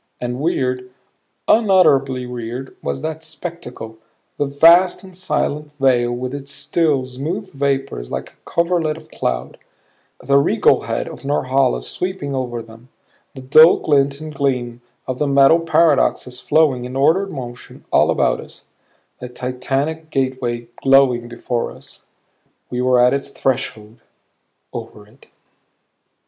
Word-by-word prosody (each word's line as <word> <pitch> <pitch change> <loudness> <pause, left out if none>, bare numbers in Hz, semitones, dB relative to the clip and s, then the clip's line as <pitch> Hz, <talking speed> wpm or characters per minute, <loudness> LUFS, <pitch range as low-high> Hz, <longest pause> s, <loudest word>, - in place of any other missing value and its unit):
And 125 +1 -4
weird, 130 -5 -1 0.6
unutterably 140 - +3
weird 125 +1 -6
was - - -3
that 160 0 -4
spectacle 160 -9 -8 0.4
the 145 - +1
vast 170 +7 +5
and 185 -1 -13
silent 150 -5 -2
vale 125 -3 +3
with 125 +2 -4
its 140 0 -6
still, 150 -6 0
smooth 165 +10 -5
vapors 135 - -2
like - - -5
a - - -18
coverlet 170 -2 0
of - - -16
cloud; 60 +2 -3 0.6
the 140 0 +3
regal 140 - +3
head - - -2
of - - -10
Norhala 135 -1 +1
sweeping 180 -6 -3
over 120 -3 -3
them; 115 +2 -16 0.5
the 130 - -9
dull 155 +6 +7
glint 140 -2 +1
and 155 0 -8
gleam 125 -4 -2 0.2
of 130 -1 -4
the 150 - +1
metal 140 +4 +5
paradoxes 155 -6 +2
flowing, 140 -6 +2
in 125 +1 -7
ordered 170 +9 +2
motion, 125 -3 -9
all - - +4
about - - +1
us; - - -13 0.6
the 125 - -7
titanic 135 +6 -3
gateway, 130 -4 -2
glowing 135 -3 +4
before 120 0 -3
us. - - -13 0.7
We 125 0 -2
were 125 0 +3
at 125 +1 +5
its 140 0 -2
threshold; 120 -5 -3 0.7
over 105 - -8
it. 115 +6 -22
135 Hz, 135 wpm, -19 LUFS, 125-155 Hz, 0.7 s, dull